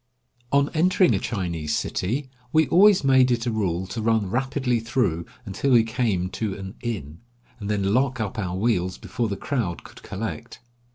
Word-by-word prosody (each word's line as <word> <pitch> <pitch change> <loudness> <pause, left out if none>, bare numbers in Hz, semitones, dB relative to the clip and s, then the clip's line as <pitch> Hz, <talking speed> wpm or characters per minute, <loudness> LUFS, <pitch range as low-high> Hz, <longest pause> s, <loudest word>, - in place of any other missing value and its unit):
On 140 0 +3
entering 180 +3 +4
a - - +1
Chinese 85 -8 -2
city 130 +9 -2 0.2
we 160 0 +4
always 195 +1 +6
made 130 -1 +5
it 120 -1 0
a 120 - 0
rule 95 -5 -1
to 110 +4 -5
run 110 -2 +2
rapidly 130 -1 0
through 110 -8 -1 0.2
until 100 +7 -2
we 115 -2 +6
came 110 -5 0
to 105 -4 -3
an 95 0 -7
inn, 85 - -5 0.4
and 100 -1 -5
then 100 -1 +1
lock 130 +1 +1
up 110 -1 -3
our 90 -3 -2
wheels 95 -4 0
before 120 - -3
the 100 -2 -3
crowd 115 - -2
could - - -14
collect. 105 +3 -6
115 Hz, 175 wpm, -24 LUFS, 95-130 Hz, 0.4 s, always